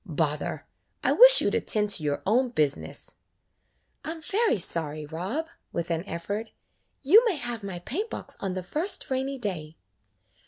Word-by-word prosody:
"Bother! 155 Hz, -5 st, -2 dB, 0.4 s
I -, -, +2 dB
wish -, -, +10 dB
you -, -, +1 dB
'd -, -, -7 dB
attend 210 Hz, -1 st, +1 dB
to 170 Hz, -, 0 dB
your 145 Hz, -1 st, -2 dB
own 245 Hz, +5 st, +2 dB
business." 140 Hz, -, -2 dB, 0.9 s
"I 305 Hz, -, -6 dB
'm 325 Hz, 0 st, -6 dB
very 425 Hz, -, +1 dB
sorry, 155 Hz, -4 st, -1 dB
Rob," 185 Hz, -, -4 dB, 0.2 s
with 170 Hz, 0 st, -4 dB
an 165 Hz, 0 st, -1 dB
effort. 200 Hz, +6 st, -5 dB, 0.5 s
"You 395 Hz, -, +6 dB
may 405 Hz, -, +1 dB
have 240 Hz, -5 st, -4 dB
my 195 Hz, -3 st, -6 dB
paint 360 Hz, -, -4 dB
box -, -, -6 dB
on 190 Hz, -2 st, -4 dB
the 185 Hz, -, -4 dB
first 315 Hz, -, -3 dB
rainy 265 Hz, +1 st, -2 dB
day." 170 Hz, -9 st, -6 dB
205 Hz, 165 wpm, -26 LUFS, 165-275 Hz, 0.9 s, wish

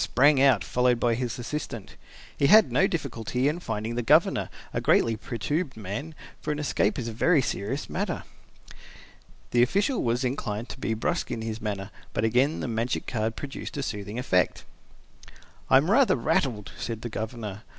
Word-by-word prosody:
sprang 140 Hz, +1 st, +4 dB
out, 130 Hz, -8 st, +5 dB
followed 125 Hz, -1 st, +2 dB
by 120 Hz, -1 st, +2 dB
his 120 Hz, -1 st, -2 dB
assistant. 120 Hz, -4 st, -5 dB, 0.4 s
He 140 Hz, -, +2 dB
had 215 Hz, +4 st, +7 dB
no 190 Hz, -, +4 dB
difficulty 125 Hz, -, -2 dB
in 155 Hz, +4 st, 0 dB
finding 110 Hz, -6 st, -3 dB
the 120 Hz, -, -1 dB
Governor, 115 Hz, -, +3 dB, 0.2 s
a -, -, -1 dB
greatly 115 Hz, -1 st, +3 dB
perturbed 125 Hz, +7 st, -3 dB
man, 110 Hz, +10 st, -5 dB, 0.3 s
for 150 Hz, -, -2 dB
an 150 Hz, -, -2 dB
escape 130 Hz, -8 st, 0 dB
is 120 Hz, -, -3 dB
a -, -, -3 dB
very 145 Hz, +8 st, +3 dB
serious 130 Hz, +2 st, -2 dB
matter. -, -, -3 dB, 1.3 s
The 120 Hz, -, +4 dB
official 200 Hz, -, +2 dB
was 120 Hz, +2 st, 0 dB
inclined 120 Hz, -3 st, -3 dB
to -, -, -8 dB
be 110 Hz, -, -1 dB
brusque 170 Hz, +10 st, -1 dB
in 110 Hz, -, -3 dB
his 110 Hz, 0 st, -4 dB
manner, 100 Hz, -1 st, -4 dB, 0.2 s
but 105 Hz, -, -1 dB
again 125 Hz, +7 st, +2 dB
the -, -, -2 dB
magic 115 Hz, +1 st, -1 dB
card 110 Hz, -1 st, -2 dB
produced 145 Hz, 0 st, -6 dB
a 140 Hz, -, -2 dB
soothing 105 Hz, -2 st, -5 dB
effect. 90 Hz, -8 st, +1 dB, 1.1 s
"I -, -, +8 dB
am 155 Hz, +8 st, +2 dB
rather 265 Hz, +3 st, +5 dB
rattled," 125 Hz, -6 st, 0 dB
said 115 Hz, -1 st, -4 dB
the 120 Hz, -, -3 dB
Governor. 110 Hz, -2 st, -5 dB
120 Hz, 175 wpm, -27 LUFS, 110-140 Hz, 1.3 s, I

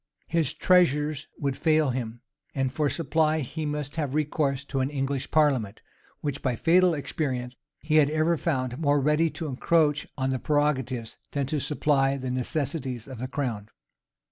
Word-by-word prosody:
his 165 Hz, -5 st, +1 dB
treasures 155 Hz, -4 st, +3 dB
would 140 Hz, -2 st, -1 dB
fail 155 Hz, -3 st, +2 dB
him; 120 Hz, -2 st, -4 dB, 0.3 s
and 135 Hz, -1 st, 0 dB
for 145 Hz, +1 st, +1 dB
supply 160 Hz, 0 st, +1 dB
he 155 Hz, +3 st, -4 dB
must 150 Hz, +1 st, -4 dB
have 145 Hz, -3 st, -1 dB
recourse 145 Hz, -2 st, 0 dB
to 135 Hz, -1 st, -2 dB
an 130 Hz, +1 st, +1 dB
English 135 Hz, -1 st, -2 dB
parliament, 135 Hz, -10 st, +1 dB, 0.4 s
which, 145 Hz, -2 st, -3 dB
by 125 Hz, -3 st, 0 dB
fatal 175 Hz, +5 st, +4 dB
experience, 130 Hz, -4 st, -3 dB, 0.3 s
he 155 Hz, 0 st, +2 dB
had 145 Hz, -2 st, +5 dB
ever 155 Hz, +2 st, +2 dB
found 130 Hz, -5 st, -2 dB
more 145 Hz, -2 st, +3 dB
ready 150 Hz, +4 st, +2 dB
to 165 Hz, -, -6 dB
encroach 150 Hz, +1 st, +1 dB
on 130 Hz, -1 st, 0 dB
the 130 Hz, -, -1 dB
prerogatives, 130 Hz, -6 st, -1 dB
than 140 Hz, -1 st, 0 dB
to 150 Hz, +3 st, -1 dB
supply 140 Hz, -1 st, +1 dB
the 130 Hz, -1 st, -4 dB
necessities 130 Hz, -1 st, -2 dB
of 130 Hz, -4 st, -8 dB
the 130 Hz, -, -3 dB
crown. 120 Hz, -7 st, -3 dB
145 Hz, 165 wpm, -26 LUFS, 130-155 Hz, 0.4 s, had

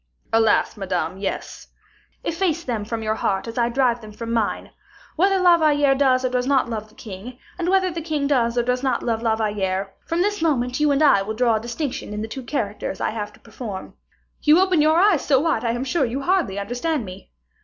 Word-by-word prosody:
"Alas! 225 Hz, 0 st, +3 dB
Madame, 185 Hz, -2 st, -2 dB
yes." 195 Hz, -, -5 dB, 0.6 s
"Efface 340 Hz, -1 st, -1 dB
them 230 Hz, -7 st, -2 dB
from 225 Hz, +1 st, -4 dB
your 215 Hz, 0 st, 0 dB
heart 195 Hz, -1 st, -1 dB
as 230 Hz, +2 st, -4 dB
I 235 Hz, 0 st, +2 dB
drive 245 Hz, -1 st, +1 dB
them 215 Hz, -1 st, -10 dB
from 230 Hz, +2 st, -5 dB
mine. 225 Hz, -3 st, -1 dB, 0.4 s
Whether 385 Hz, +3 st, +3 dB
La 355 Hz, -2 st, +5 dB
Valliere 290 Hz, -3 st, +4 dB
does 260 Hz, -2 st, +2 dB
or -, -, +1 dB
does 250 Hz, 0 st, -1 dB
not 270 Hz, -3 st, +3 dB
love 215 Hz, -2 st, -5 dB
the 215 Hz, -, -23 dB
king, 215 Hz, +4 st, -9 dB, 0.2 s
and 350 Hz, 0 st, 0 dB
whether 375 Hz, -1 st, +3 dB
the 335 Hz, 0 st, -4 dB
king 305 Hz, -3 st, -2 dB
does 245 Hz, -4 st, +1 dB
or 240 Hz, -, +3 dB
does 250 Hz, +1 st, 0 dB
not 265 Hz, -1 st, 0 dB
love 225 Hz, -2 st, -1 dB
La 225 Hz, -1 st, +2 dB
Valliere 195 Hz, -3 st, -2 dB
from 335 Hz, +2 st, +1 dB
this 410 Hz, -1 st, -1 dB
moment 255 Hz, -5 st, 0 dB
you 300 Hz, 0 st, +3 dB
and 280 Hz, +2 st, +2 dB
I 270 Hz, -10 st, +5 dB
will 215 Hz, +3 st, -4 dB
draw 230 Hz, -1 st, +2 dB
a -, -, -5 dB
distinction 240 Hz, -2 st, -4 dB
in 210 Hz, -, -3 dB
the -, -, -4 dB
two 265 Hz, +4 st, -6 dB
characters 230 Hz, -5 st, -3 dB
I -, -, 0 dB
have 210 Hz, -1 st, -5 dB
to -, -, -19 dB
perform. 220 Hz, -4 st, -8 dB, 0.5 s
You 305 Hz, +3 st, +5 dB
open 370 Hz, -4 st, +3 dB
your 310 Hz, +2 st, +4 dB
eyes 375 Hz, -4 st, +4 dB
so 275 Hz, -2 st, +3 dB
wide 315 Hz, -6 st, +1 dB
that 235 Hz, -, -2 dB
I -, -, +1 dB
am 240 Hz, -, -2 dB
sure 275 Hz, +3 st, 0 dB
you 255 Hz, +2 st, -2 dB
hardly 355 Hz, -, +1 dB
understand 245 Hz, +6 st, -2 dB
me." 185 Hz, 0 st, -11 dB
245 Hz, 230 wpm, -22 LUFS, 220-300 Hz, 0.6 s, La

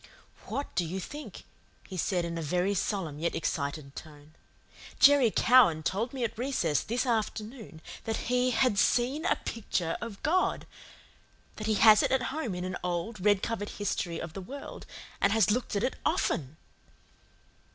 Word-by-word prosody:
"What 280 Hz, -, -4 dB
do 180 Hz, -, +1 dB
you 175 Hz, +3 st, -4 dB
think?" 295 Hz, +11 st, -8 dB, 0.4 s
he 190 Hz, -, -8 dB
said 180 Hz, 0 st, 0 dB
in 170 Hz, 0 st, -4 dB
a 165 Hz, -, -3 dB
very 180 Hz, +6 st, 0 dB
solemn, 185 Hz, -6 st, -2 dB
yet 170 Hz, +2 st, -1 dB
excited, 140 Hz, -2 st, -3 dB
tone. 150 Hz, -1 st, -12 dB, 0.7 s
"Jerry 280 Hz, -4 st, +7 dB
Cowan 215 Hz, -10 st, +5 dB
told 215 Hz, +9 st, -1 dB
me 265 Hz, -3 st, -4 dB
at 230 Hz, -, -2 dB
recess 180 Hz, -, 0 dB
this 245 Hz, +4 st, -1 dB
afternoon 220 Hz, -5 st, -3 dB, 0.2 s
that 225 Hz, -1 st, -3 dB
he 250 Hz, 0 st, +3 dB
HAD 245 Hz, -4 st, +2 dB
SEEN 260 Hz, -, +2 dB
A -, -, +3 dB
PICTURE 180 Hz, -7 st, -3 dB
OF 230 Hz, -4 st, -7 dB
GOD 365 Hz, +4 st, +1 dB, 0.9 s
that 215 Hz, -, -4 dB
he 215 Hz, -, +2 dB
has 215 Hz, 0 st, +7 dB
it -, -, +1 dB
at 260 Hz, -1 st, +2 dB
home 265 Hz, -, -3 dB
in 180 Hz, -, -4 dB
an 185 Hz, -1 st, -3 dB
old, 180 Hz, +3 st, -3 dB
red 205 Hz, -2 st, +3 dB
covered 205 Hz, -3 st, -2 dB
history 175 Hz, -4 st, -2 dB
of 160 Hz, -, -6 dB
the 195 Hz, -, -6 dB
world, 275 Hz, +10 st, -9 dB, 0.3 s
and 200 Hz, -, +4 dB
has 220 Hz, -3 st, +4 dB
looked 240 Hz, -1 st, -1 dB
at 200 Hz, -, 0 dB
it 255 Hz, -, 0 dB
OFTEN." 160 Hz, -, -1 dB
205 Hz, 170 wpm, -29 LUFS, 170-245 Hz, 0.9 s, Jerry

